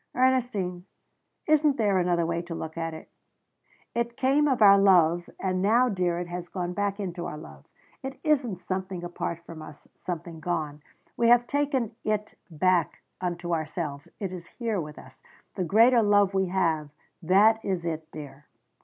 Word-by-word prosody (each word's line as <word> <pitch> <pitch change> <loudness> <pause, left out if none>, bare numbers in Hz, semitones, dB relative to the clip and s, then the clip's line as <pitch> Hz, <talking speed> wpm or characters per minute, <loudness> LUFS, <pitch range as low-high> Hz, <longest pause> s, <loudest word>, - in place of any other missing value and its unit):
"Ernestine, 240 -9 +1 0.6
isn't 305 -2 +3
there 205 -4 +2
another 175 -1 +1
way 170 0 -1
to 170 -1 -7
look 160 -1 -6
at 165 -1 -3
it? 160 - -11 0.9
It 235 0 -2
came 280 +3 +3
of 265 -3 +1
our 200 -2 +8
love, 175 -3 +4
and 185 -1 -1
now, 235 +6 +4
dear, 180 -4 0
it 175 - -3
has 175 0 -6
gone 180 -1 -3
back 205 +1 -1
into 180 -3 -4
our 150 - -6
love. 70 - -12 0.4
It 265 +1 -7
isn't 275 - +1
something 185 0 -4
apart 170 -1 -4
from 165 -2 -9
us, 150 -1 -12
something 170 -2 -6
gone. 155 -3 -3 0.3
We 235 - +2
have 240 0 +6
taken 270 -5 -1
it 215 0 -1 0.2
back 175 +1 +1 0.2
unto 175 -1 -2
ourselves. 155 -2 -3
It 195 -3 -4
is 175 -2 -8
here 225 -6 -3
with 150 -1 -8
us. 130 0 -14 0.3
The 185 - -2
greater 230 +6 +5
love 205 -2 +3
we 190 -1 +1
have 165 -5 0 0.3
that 210 +6 +4
is 185 -4 -2
it, 160 -1 -4
dear." 145 -1 -10
185 Hz, 170 wpm, -27 LUFS, 170-220 Hz, 0.9 s, our